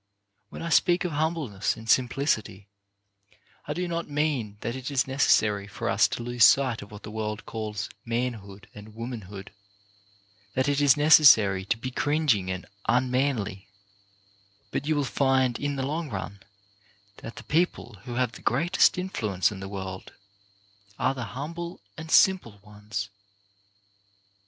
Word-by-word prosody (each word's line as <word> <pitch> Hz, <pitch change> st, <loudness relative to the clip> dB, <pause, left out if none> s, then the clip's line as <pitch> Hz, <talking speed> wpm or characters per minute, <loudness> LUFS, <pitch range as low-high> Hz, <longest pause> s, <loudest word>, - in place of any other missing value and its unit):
When -, -, -8 dB
I 170 Hz, -, -3 dB
speak 175 Hz, +2 st, +3 dB
of 180 Hz, -, -2 dB
humbleness 150 Hz, -, -1 dB
and 110 Hz, 0 st, -11 dB
simplicity, 115 Hz, -5 st, +1 dB, 1.0 s
I 150 Hz, -, -2 dB
do 180 Hz, 0 st, -2 dB
not 170 Hz, -2 st, -3 dB
mean 145 Hz, -8 st, -1 dB
that 115 Hz, -, -3 dB
it 130 Hz, +1 st, -5 dB
is 140 Hz, -3 st, +1 dB
necessary 105 Hz, -7 st, +2 dB
for 100 Hz, -, -5 dB
us -, -, +4 dB
to -, -, -5 dB
lose 120 Hz, -1 st, +1 dB
sight 125 Hz, +3 st, +5 dB
of 100 Hz, -, -11 dB
what 105 Hz, -, -11 dB
the 105 Hz, -, -8 dB
world 105 Hz, 0 st, -4 dB
calls 105 Hz, -3 st, -4 dB, 0.2 s
manhood 115 Hz, -5 st, -4 dB
and 105 Hz, 0 st, -12 dB
womanhood; 110 Hz, -5 st, -7 dB, 1.0 s
that 130 Hz, +1 st, +1 dB
it 145 Hz, 0 st, +1 dB
is 145 Hz, 0 st, +5 dB
necessary 115 Hz, -11 st, +6 dB
to 110 Hz, -, 0 dB
be 130 Hz, +3 st, -5 dB
cringing 145 Hz, -10 st, +1 dB
and 95 Hz, 0 st, -4 dB, 0.2 s
unmanly; 125 Hz, -5 st, 0 dB, 1.0 s
but 140 Hz, -, -3 dB
you 155 Hz, -, +2 dB
will 145 Hz, -, +1 dB
find, 130 Hz, -2 st, +1 dB
in 145 Hz, 0 st, -2 dB
the 135 Hz, -1 st, -2 dB
long 155 Hz, +2 st, -3 dB
run, 100 Hz, 0 st, -6 dB, 0.8 s
that 115 Hz, -, -9 dB
the -, -, -10 dB
people 150 Hz, -, -1 dB
who 120 Hz, -, -5 dB
have 125 Hz, -2 st, +1 dB
the -, -, -12 dB
greatest 170 Hz, +11 st, +3 dB
influence 110 Hz, -, -1 dB
in 100 Hz, -, -7 dB
the 95 Hz, 0 st, -7 dB
world 95 Hz, -1 st, -7 dB, 0.8 s
are 130 Hz, -, +1 dB
the 125 Hz, -3 st, -5 dB
humble 165 Hz, -, -6 dB, 0.2 s
and 160 Hz, 0 st, -9 dB
simple 180 Hz, -, +4 dB
ones. 105 Hz, -1 st, -6 dB
120 Hz, 150 wpm, -26 LUFS, 105-145 Hz, 1.0 s, necessary